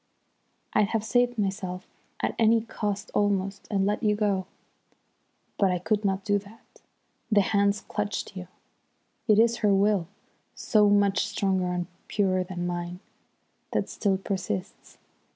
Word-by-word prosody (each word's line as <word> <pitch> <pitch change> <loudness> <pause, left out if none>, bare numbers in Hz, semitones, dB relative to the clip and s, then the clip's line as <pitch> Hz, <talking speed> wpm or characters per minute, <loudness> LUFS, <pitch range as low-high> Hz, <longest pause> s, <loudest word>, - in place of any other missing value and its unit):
I'd 210 -1 +4
have 225 -2 +1
saved 245 +1 +2
myself 190 -2 -2 0.4
at - - 0
any 225 0 +5
cost 210 -2 -4
almost, 195 -1 0
and 195 -2 +1
let 210 +1 0
you 210 -2 +2
go. 200 -3 0 1.1
But 195 - +4
I 180 - +1
could 210 +4 0
not 195 -1 0
do 205 -1 +2
that. 205 +3 -18 0.5
The 205 -1 +6
hands 200 +1 +2
clutched 205 -1 -4
you. 180 -1 -7 0.8
It 215 -2 +5
is 230 +1 +4
her 205 -4 +3
will, 195 -3 +2 0.5
so 210 -2 +3
much 205 0 +3
stronger 190 -3 0
and 180 0 -1 0.2
purer 185 -3 +1
than 180 -1 -5
mine, 175 0 -4 0.7
that - - 0
still 195 -3 0
persists. 185 - -5
200 Hz, 140 wpm, -27 LUFS, 190-210 Hz, 1.1 s, The